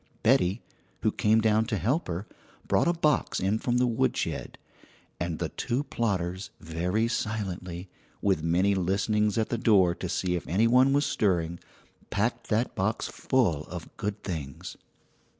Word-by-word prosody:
Betty, 110 Hz, -4 st, +3 dB, 0.4 s
who -, -, +2 dB
came 110 Hz, +1 st, +3 dB
down 110 Hz, 0 st, +3 dB
to 110 Hz, -2 st, -1 dB
help 125 Hz, -, 0 dB
her, 90 Hz, +4 st, -3 dB, 0.4 s
brought -, -, +3 dB
a -, -, +5 dB
box 155 Hz, -3 st, +1 dB
in 100 Hz, +4 st, +1 dB
from 120 Hz, +1 st, 0 dB
the 125 Hz, -, +3 dB
woodshed; 115 Hz, -2 st, -1 dB, 0.6 s
and 85 Hz, -2 st, -2 dB
the 85 Hz, -2 st, -2 dB
two 125 Hz, +3 st, -2 dB
plotters, 95 Hz, -7 st, -2 dB
very 90 Hz, +7 st, -1 dB
silently, 95 Hz, -6 st, -3 dB, 0.3 s
with 95 Hz, -5 st, +1 dB
many 90 Hz, +5 st, +2 dB
listenings 100 Hz, +3 st, +1 dB
at 110 Hz, -, +1 dB
the 120 Hz, -, -1 dB
door 95 Hz, -7 st, +4 dB
to -, -, -5 dB
see 90 Hz, -1 st, 0 dB
if 85 Hz, -, -4 dB
any 100 Hz, +7 st, +2 dB
one 125 Hz, +3 st, +5 dB
was 145 Hz, +1 st, +3 dB
stirring, 85 Hz, -7 st, 0 dB, 0.5 s
packed 110 Hz, +4 st, -1 dB
that 115 Hz, +3 st, +1 dB
box 105 Hz, +4 st, -1 dB
full 90 Hz, -, +1 dB
of 85 Hz, -1 st, -8 dB
good 105 Hz, 0 st, -4 dB
things. 75 Hz, -8 st, -5 dB
100 Hz, 155 wpm, -28 LUFS, 90-115 Hz, 0.6 s, a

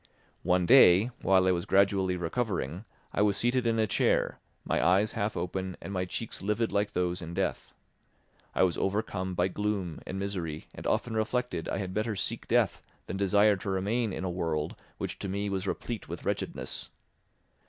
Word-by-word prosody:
One 90 Hz, 0 st, +2 dB
day, 110 Hz, -2 st, +7 dB
while 95 Hz, -1 st, +4 dB
I -, -, +5 dB
was 85 Hz, 0 st, -1 dB
gradually 95 Hz, -1 st, +3 dB
recovering, 90 Hz, -, -2 dB, 0.3 s
I -, -, +1 dB
was 105 Hz, -2 st, +3 dB
seated 120 Hz, 0 st, +1 dB
in 115 Hz, -1 st, +2 dB
a 110 Hz, -, +3 dB
chair, 105 Hz, -, +1 dB, 0.3 s
my -, -, +1 dB
eyes 95 Hz, +6 st, +4 dB
half 105 Hz, 0 st, -2 dB
open 95 Hz, +1 st, -3 dB
and 100 Hz, -, -7 dB
my 90 Hz, -1 st, 0 dB
cheeks 110 Hz, +5 st, -5 dB
livid 105 Hz, +3 st, 0 dB
like 105 Hz, +1 st, 0 dB
those 90 Hz, 0 st, 0 dB
in 85 Hz, 0 st, -6 dB
death. 95 Hz, 0 st, -2 dB, 0.8 s
I -, -, +4 dB
was 90 Hz, -2 st, +1 dB
overcome 95 Hz, -2 st, -1 dB
by 90 Hz, +1 st, +2 dB
gloom 100 Hz, -4 st, -2 dB
and 95 Hz, -, -4 dB
misery 90 Hz, -6 st, -3 dB
and -, -, -6 dB
often 120 Hz, -, 0 dB
reflected 110 Hz, -4 st, -1 dB
I -, -, -1 dB
had 95 Hz, -2 st, -4 dB
better 110 Hz, +1 st, -1 dB
seek 95 Hz, -, -3 dB
death -, -, +2 dB, 0.2 s
than -, -, -5 dB
desire 100 Hz, +2 st, +4 dB
to 100 Hz, -, -5 dB
remain 105 Hz, +4 st, 0 dB
in 90 Hz, -, -4 dB
a -, -, -1 dB
world 80 Hz, -3 st, -2 dB, 0.2 s
which -, -, -4 dB
to 100 Hz, -, -4 dB
me 100 Hz, +2 st, -2 dB
was 95 Hz, 0 st, -2 dB
replete 115 Hz, +3 st, -4 dB
with -, -, -6 dB
wretchedness. -, -, -3 dB
95 Hz, 185 wpm, -29 LUFS, 90-105 Hz, 0.8 s, day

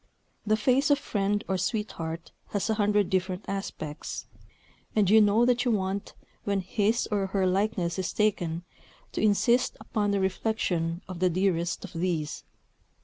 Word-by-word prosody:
The 215 Hz, 0 st, +3 dB
face 260 Hz, +6 st, +3 dB
of 285 Hz, -, +5 dB
friend 205 Hz, -5 st, -1 dB
or 190 Hz, -1 st, 0 dB
sweetheart 175 Hz, -6 st, -3 dB, 0.2 s
has 205 Hz, +1 st, -1 dB
a -, -, +3 dB
hundred 205 Hz, -2 st, +2 dB
different 185 Hz, 0 st, -1 dB
aspects; 165 Hz, -6 st, -5 dB, 0.7 s
and 210 Hz, -3 st, +4 dB
you 220 Hz, +3 st, +7 dB
know 210 Hz, +3 st, +4 dB
that 245 Hz, 0 st, +3 dB
you 250 Hz, -, +1 dB
want, 195 Hz, -2 st, -1 dB, 0.3 s
when 200 Hz, -1 st, 0 dB
his 210 Hz, +5 st, +1 dB
or 200 Hz, -2 st, +1 dB
her 190 Hz, 0 st, 0 dB
"likeness" 190 Hz, -2 st, 0 dB
is 185 Hz, -, -1 dB
taken, 175 Hz, -6 st, 0 dB, 0.5 s
to -, -, -2 dB
insist 235 Hz, +4 st, +3 dB
upon 210 Hz, -2 st, -1 dB
the 200 Hz, 0 st, +1 dB
reflection 185 Hz, -4 st, -1 dB
of 185 Hz, -2 st, -7 dB
the 185 Hz, 0 st, +3 dB
dearest 175 Hz, 0 st, 0 dB
of 190 Hz, -, -11 dB
these. 165 Hz, -3 st, -2 dB
200 Hz, 155 wpm, -28 LUFS, 180-215 Hz, 0.7 s, you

